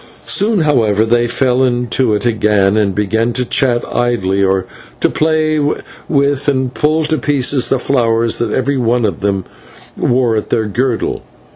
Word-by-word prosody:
Soon, 205 -1 +1
however, 110 -8 +2
they 120 +1 +1
fell 125 +1 0
into 125 -2 0
it 105 - -3
again, 105 -3 +2
and 100 -3 0
began 110 +3 0
to 125 0 -1
chat 120 -1 +1
idly, 100 -6 0
or 95 -1 +1 0.3
to - - +1
play 155 0 +1 0.5
with 140 -1 +1
and 130 -3 0
pull 155 +1 +1
to 155 0 -1
pieces 135 -1 +1
the 135 - +2
flowers 115 -3 0
that 115 -2 -1
every 135 +3 0
one 120 -1 +1
of 100 -5 -2
them 100 -2 -1 0.5
wore 120 -2 +1
at 110 - -3
her 110 - +1
girdle. 120 +3 -2
120 Hz, 160 wpm, -15 LUFS, 110-135 Hz, 0.5 s, however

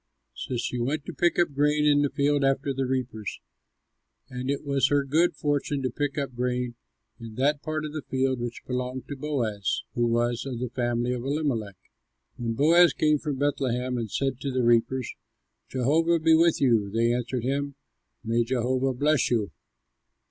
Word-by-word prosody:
So 125 - -4
she 125 +1 -2
went 140 +5 -1
to - - -6
pick 175 -1 +1
up 175 -4 +2
grain 150 +1 +2
in 145 -1 +4
the 145 - +2
field 140 +1 +1
after 135 0 +1
the 135 -1 -1
reapers; 125 -5 -3 0.9
and 125 +1 -4
it 140 - -1
was 140 -1 +2
her 145 0 +2
good 160 +6 +2
fortune 145 -1 -1
to 130 - -1
pick 145 +3 -2
up 140 -3 -2
grain 125 0 -2 0.5
in 115 -2 -9
that 140 +3 +1
part 155 0 -3
of 150 - -6
the 155 - -4
field 130 -1 -1
which 120 0 -5
belonged 125 0 -4
to 145 - -4
Boaz, 125 -8 -2
who 120 0 +1
was 120 0 0
of 130 -3 -5
the 125 0 -4
family 120 0 -1
of 120 -1 -4
Elimelech. 135 -9 -2 0.6
When 115 -2 -2
Boaz 165 +7 +5
come 150 -1 +2
from 150 -2 -3
Bethlehem 130 -3 0
and 115 -2 -4
said 135 +3 -1
to 140 - -2
the 130 -1 0
reapers, 120 +2 +2 0.6
"Jehovah 160 +7 +2
be 160 0 +3
with 165 +1 +4
you," 115 -7 +3
they 115 +3 +1
answered 125 0 -2
him, 140 +2 -2 0.5
"May 115 +1 +1
Jehovah 130 +2 0
bless 145 0 +2
you." 110 -7 0
130 Hz, 180 wpm, -26 LUFS, 120-145 Hz, 0.9 s, Boaz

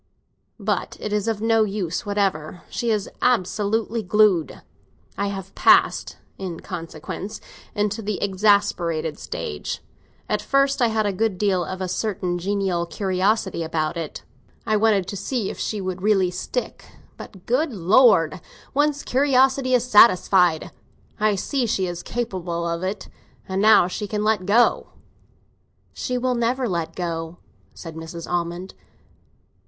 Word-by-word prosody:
But - - -2
it 210 - -4
is 210 0 0
of 220 -2 -1
no 225 -1 +4
use 195 -3 -3
whatever; 190 -5 -1
she 235 - -2
is 210 -3 0
absolutely 220 0 +1
glued. 200 -4 +2 0.5
I 200 - -1
have 195 -1 -6
passed, - - +3 0.2
in 180 -4 -5
consequence, 165 +5 -7 0.4
into 210 +1 -1
the 210 -1 -3
exasperated 185 -6 +1
stage. 75 -2 -5 0.5
At 210 - 0
first 275 -1 +2
I 240 - +5
had 220 -1 0
a 200 - 0
good 210 0 0
deal 190 -2 +1
of 185 +2 -6
a 185 - -1
certain 185 -3 -2
genial 190 -2 -1
curiosity 190 0 0
about 160 0 -2
it; 165 -3 -6 0.4
I 215 -2 +1
wanted 210 -3 +3
to 200 - -5
see 200 +2 -2
if - - -10
she 215 - -2
really 190 +1 +1
would 180 - -3
stick. 340 - -4 0.3
But, 190 -2 -12
good 275 +6 +1
Lord, 190 -4 +4 0.3
one's 290 0 +1
curiosity 265 -1 +3
is 240 - +2
satisfied! 185 -6 +5 0.5
I 210 -1 +2
see 250 +5 -1
she 190 -3 0
is 175 -1 -4
capable 180 -8 -3
of 170 0 -2
it, 190 +1 -4 0.4
and 190 +1 -1
now 215 -4 +6
she 205 +3 -4
can 210 0 -2
let 210 -3 +1
go." 230 +4 +3 1.0
"She 250 - -3
will 255 0 0
never 245 +2 0
let 170 -4 -3
go," 165 -1 -4 0.4
said 165 -2 -8
Mrs. 160 +1 -8
Almond. 175 +1 -3
200 Hz, 145 wpm, -23 LUFS, 175-220 Hz, 1.0 s, now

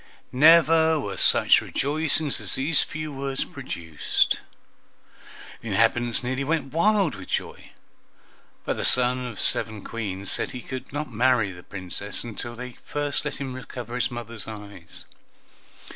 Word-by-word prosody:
Never 160 +2 +6
were 100 -8 -4
such - - +5
rejoicings 150 0 0
as - - +2
these 145 +4 +3
few 155 -1 -5
words 135 0 -2
produced. 80 -3 -1 1.2
The - - -9
inhabitants 120 0 +2
nearly 130 +2 -1
went 150 -2 -1
wild 195 - +3
with 95 -2 -9
joy, - - -3 1.0
but - - -1
the - - -2
son 125 0 +4
of 115 -4 -8
seven 110 -3 -1
Queens 100 -4 -4
said - - -1
he 125 - -7
would 130 -1 -6
not 145 0 -4
marry 120 -3 +3
the 90 -1 -11
Princess 95 +2 -3
unless 115 -3 -5 0.2
they 125 -1 -8
first 145 -1 -2
let - - -3
him 135 -1 -5
recover 125 -2 -8
his 125 -1 0
mothers' 115 -2 -5
eyes. 100 -6 -7
125 Hz, 145 wpm, -25 LUFS, 110-145 Hz, 1.2 s, Never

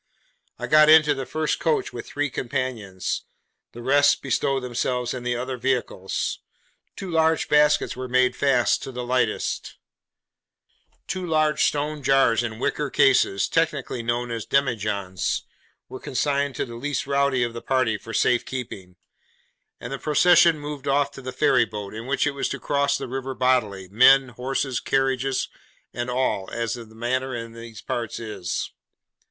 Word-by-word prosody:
I - - -4
got 155 0 +6
into 155 -1 +7
the 135 -2 -5
first 155 -1 -1
coach 160 -2 0
with 120 - -7
three 145 -1 -2
companions; 120 -8 -3 0.5
the 120 - -9
rest 145 +2 +3
bestowed 135 0 0
themselves 125 0 -2
in 130 - -5
the 120 0 -1
other 130 +1 -4
vehicles; 120 -7 -2 0.6
two 190 -2 -6
large 160 -1 +2
baskets 150 0 +3
were 130 0 -5
made 125 0 +2
fast 135 -4 +2
to 135 - -6
the 125 -1 -5
lightest; 125 0 -1 1.3
two 185 - -4
large 155 -3 +1
stone 150 +1 0
jars 135 -4 +3
in 115 -2 -4
wicker 145 +4 -1
cases, 125 -7 +3
technically 150 -7 -1
known 120 +1 -2
as 115 -2 -4
demi 140 -3 +2
johns, 100 -3 -2 0.4
were 130 - -8
consigned 140 0 -1
to - - -2
the 120 - -10
'least 140 +4 -3
rowdy' 140 -2 +1
of 120 -1 -3
the 115 - -7
party 130 -4 +1
for 115 +2 -9
safe 120 +2 +2
keeping; 100 -8 -7 0.8
and 120 +3 -6
the 135 - -4
procession 165 +2 +5
moved 145 -1 -7
off 140 +1 +2
to 135 - -11
the 130 0 -6
ferryboat, 105 -5 +1
in 110 +3 -7
which 135 0 +1
it 145 - +1
was 140 -1 -2
to 140 - -3
cross 140 0 +1
the - - -6
river 130 +1 -4
bodily, 110 -8 +1
men, 130 +5 +6
horses, 130 +1 -2
carriages, 135 -1 0 0.5
and 120 +1 -3
all, 125 -6 -1
as 115 -1 -2
the 120 -1 -7
manner 125 +4 -2
in 115 -1 -6
these 115 -2 -10
parts 115 -3 -3
is. 105 -7 -4
130 Hz, 160 wpm, -24 LUFS, 120-140 Hz, 1.3 s, into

